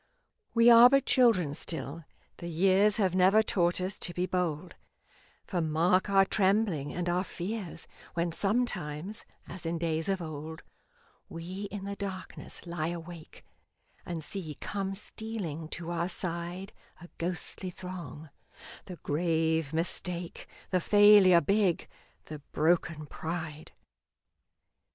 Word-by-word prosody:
We 230 0 +5
are 235 +1 +10
but 275 0 +3
children 215 - +3
still, 160 0 -4 0.3
the 170 - -7
years 190 +5 +3
Have 190 -5 +1
never 190 +4 +5
taught 175 -4 +1
us 185 +2 -2
to 175 - -2
be 180 - 0
bold, 180 -2 -2 0.7
For 180 -3 -2
mark 170 +5 +2
our 195 -1 +5
trembling 195 -7 +1
and 180 0 -3
our 175 +1 +1
fears 185 -2 -6 0.3
When 170 0 0
sometimes, 200 -2 -2 0.2
as 185 - -8
in 165 0 -2
days 165 +1 -1
of 195 -1 +1
old, 160 0 -7 0.7
We 180 +5 -6
in 205 -1 -6
the 200 0 -4
darkness 190 -2 -7
lie 170 -2 -3
awake, 170 -1 -8 0.6
And 170 -3 -5
see 160 -4 -3
come 195 -1 -3
stealing 195 -7 -6
to 170 +1 -6
our 170 +1 -1
side 175 +1 -3 0.3
A 175 - -11
ghostly 180 +2 -4
throng 170 -5 -8 0.5
the 185 - -8
grave 160 -1 0
Mistake, 170 +1 -2 0.2
The 185 -1 +2
Failure 205 -4 +7
big, 195 +1 +1 0.4
the 155 -1 -8
broken 160 -1 +1
Pride. 160 -1 -6
175 Hz, 125 wpm, -30 LUFS, 160-195 Hz, 0.7 s, are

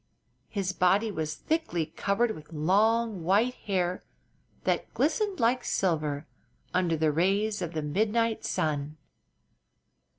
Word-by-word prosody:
His 195 -3 -2
body 195 +5 +3
was 155 -4 -3
thickly 315 - -1
covered 200 +8 0
with 155 -7 -10
long, 205 +5 +2
white 205 +8 +3
hair 185 -5 -1 0.6
that - - 0
glistened 415 -6 +1
like 245 +1 +2
silver 155 -5 0 0.5
under 175 -3 +2
the 155 0 +2
rays 195 +6 +1
of 170 -1 -3
the 155 -1 -2
midnight 220 +8 +1
sun. 150 0 -1
185 Hz, 120 wpm, -28 LUFS, 160-220 Hz, 0.6 s, body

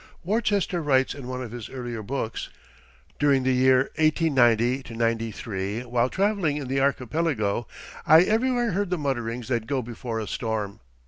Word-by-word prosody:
Worcester 200 -2 0
writes 135 -3 +2
in 135 -4 -9
one 130 0 -4
of 115 - -7
his 120 -2 -7
earlier 120 -3 -5
books, 115 +1 -4 0.7
"During 140 -3 +3
the 130 0 +2
years 130 +1 +4
1890 130 -6 +2
93, 115 -2 -2
while 120 0 +1
traveling 195 -6 +1
in 140 -3 -5
the 135 +1 0
archipelago, 130 -5 0 0.4
I 160 +2 +8
everywhere 240 +3 +1
heard 200 +1 -1
the 180 - 0
mutterings 125 -5 -3
that 115 -3 -1
go 135 -3 -1
before 115 0 -5
a 110 - -3
storm. 105 -3 -3
130 Hz, 150 wpm, -25 LUFS, 115-155 Hz, 0.7 s, I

